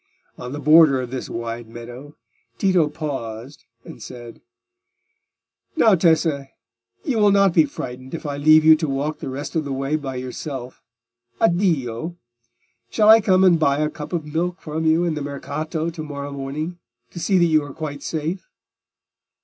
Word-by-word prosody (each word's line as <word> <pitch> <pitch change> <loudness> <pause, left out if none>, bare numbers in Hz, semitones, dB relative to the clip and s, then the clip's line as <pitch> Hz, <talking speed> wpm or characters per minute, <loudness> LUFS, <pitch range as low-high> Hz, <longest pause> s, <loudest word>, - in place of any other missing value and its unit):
On 125 - -8
the 145 - -5
border 150 -2 +6
of 125 -1 -5
this 130 - -5
wide 115 0 -5
meadow, 120 +5 -10 0.4
Tito 180 -6 +2
paused 135 -4 -6 0.2
and - - -11
said— 120 -2 -10 1.3
"Now, 225 -9 +5
Tessa, 160 -5 +2 0.6
you 265 -9 -1
will 210 -1 +5
not 195 -2 +4
be 160 -2 +5
frightened 130 0 -7
if 165 - -8
I 145 -1 -3
leave 155 +2 +5
you 160 0 +9
to 160 0 -2
walk 140 +3 -2
the - - -5
rest 140 +5 -6
of 160 - +1
the 140 - -5
way 135 +2 -1
by 135 -3 -6
yourself. 130 0 -6 0.6
Addio! 170 - 0 0.7
Shall 215 -1 +3
I 225 +1 +9
come 190 -2 +3
and 175 -3 +5
buy 140 -3 +2
a 150 0 0
cup 150 - -8
of 170 -4 -2
milk 170 +4 -2
from 160 -1 -4
you 160 +2 +3
in 170 -2 0
the 150 - -4
Mercato 155 +3 -4
to 160 -1 -7
morrow 145 -1 -6
morning, 145 +5 -5 0.3
to 175 - -8
see 190 +2 +2
that 175 - +4
you 155 -2 +3
are 145 - -8
quite 145 -1 -6
safe?" 165 +3 -4
150 Hz, 175 wpm, -22 LUFS, 135-170 Hz, 1.3 s, you